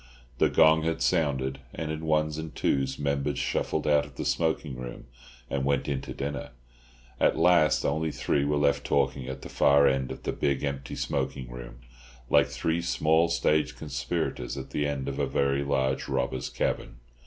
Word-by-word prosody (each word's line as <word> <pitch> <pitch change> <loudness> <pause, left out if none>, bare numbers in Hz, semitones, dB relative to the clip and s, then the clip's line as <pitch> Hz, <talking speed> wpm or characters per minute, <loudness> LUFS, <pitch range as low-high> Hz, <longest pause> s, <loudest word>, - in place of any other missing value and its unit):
The - - +4
gong 80 0 +5
had 80 +1 -1
sounded, 65 -6 +1 0.2
and 80 -1 -3
in 80 +1 -5
ones 75 -1 +1
and 80 -1 -7
twos 65 -1 0
members 70 -1 -1
shuffled 80 - -1
out 75 -1 +4
of 75 -2 -12
the - - -4
smoking 80 -4 0
room, 60 -1 -8 0.4
and 65 +1 -2
went 70 0 +1
in 70 -2 -1
to - - -8
dinner. 70 -2 -4 0.7
At - - +3
last 85 -2 +4
only 80 +2 0
three 70 - 0
were 75 +1 +1
left 70 -1 +2
talking 70 -2 0
at 65 0 -6
the - - -6
far 70 0 +5
end 65 -1 0
of - - -8
the - - -2
big, 70 -1 0
empty 70 -2 -3
smoking 65 -2 -3
room, - - -9 0.5
like - - +5
three 80 +1 -1
small 80 0 +2
stage 75 -6 +1
conspirators 65 -2 -3
at 65 - -7
the 75 - 0
end 70 -2 -3
of 70 - -3
a - - +1
very 70 0 +1
large 65 -1 0
robbers' 60 0 -1
cavern. - - -2
70 Hz, 180 wpm, -28 LUFS, 65-75 Hz, 0.7 s, gong